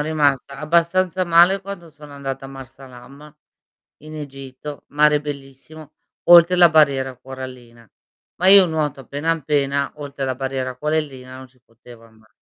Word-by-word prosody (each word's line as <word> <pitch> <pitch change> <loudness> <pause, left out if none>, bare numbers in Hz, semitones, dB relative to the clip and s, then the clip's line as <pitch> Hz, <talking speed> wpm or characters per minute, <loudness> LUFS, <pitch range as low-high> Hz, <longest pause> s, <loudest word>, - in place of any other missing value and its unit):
rimasta 145 -3 -1
abbastanza 170 +3 +1
male 175 +3 +4
quando 195 -3 -9
sono 150 -1 -15
andata 135 -1 -6
a 135 - -8
Marsa 135 0 -12
Alam 135 +4 -15 0.7
in 155 0 -11
Egitto, 135 0 -9
mare 150 0 +3
bellissimo, 145 +1 -10 0.4
oltre 175 +1 +8
la 175 -1 +7
barriera 135 -4 +2
corallina. 125 -3 -11 0.5
Ma 180 - -1
io 195 -1 +8
nuoto 150 -4 -3
appena, 145 +5 -2
appena, 140 -3 -1
oltre 140 -2 -6
la 130 -1 -2
barriera 130 -1 -4
corallina 140 -3 -4
non 130 0 -12
ci 125 0 -31
potevo 115 -1 -18
anda 110 -1 -23
140 Hz, 145 wpm, -20 LUFS, 130-155 Hz, 0.7 s, oltre